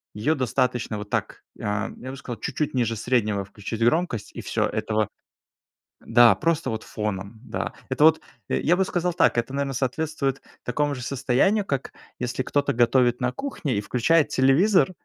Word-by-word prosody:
её 120 +10 +1
достаточно 125 -3 0
вот 105 0 -7
так, - - -2 0.2
а, 105 +1 -1
я 130 - -8
бы 135 - -8
сказал, 125 -3 -7
чуть-чуть 150 - -2
ниже 115 -3 0
среднего 105 -3 0
включить 105 +3 -7
громкость- 125 - +1
и - - -5
всё, - - 0
этого 110 -1 -1 0.9
Да, 115 -2 +6
просто 160 - 0
вот 110 -1 -4
фоном, 105 0 -4
да. - - -4 0.2
Это 150 - +2
вот, 160 0 +6 0.3
э, - - 0
я 175 - +3
бы 190 - +2
сказал 180 -1 -1
так, - - +3
это 120 +3 -1
наверно 140 -1 -1
соответствует 135 +1 -1 0.2
такому 145 +4 0
же 125 - -7
состоянию, 140 - +1
как 140 -5 -3 0.3
если 125 +1 -2
кто-то 145 +2 +1
готовит 120 0 +3
на 125 0 0
кухне 155 - -3
и - - +1
включает 145 +9 +2
телевизор, 175 +10 +4
125 Hz, 170 wpm, -24 LUFS, 115-150 Hz, 0.9 s, Да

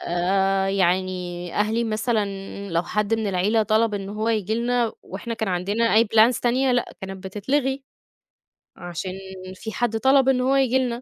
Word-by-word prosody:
آآ 190 +2 +1
يعني 180 -2 -1
أهلي 220 +3 +1
مثلًا 215 0 0 0.5
لو 170 0 +1
حد 210 +4 0
من 220 -1 -2
العيلة 200 +4 +2
طلب 215 +1 +2
إن 195 -1 -4
هو 215 +2 -2
ييجي 220 -1 0
لنا 240 -1 0
وإحنا 230 +5 -6
كان 220 -3 -3
عندنا 200 +6 0
أي 225 +2 +6
plans 225 +3 +4
تانية، 255 +2 +2
لأ 245 - -1
كانِت 190 -1 -8
بتتلغي 265 +7 -1 1.0
عشان 175 +1 -5 0.4
في 220 +3 -7
حد 225 -1 -1
طلب 265 +2 +4
إن 255 -1 +2
هو 265 +2 +2
ييجي 260 -1 +3
لنا. 245 -2 -2
215 Hz, 165 wpm, -23 LUFS, 190-235 Hz, 1.0 s, أي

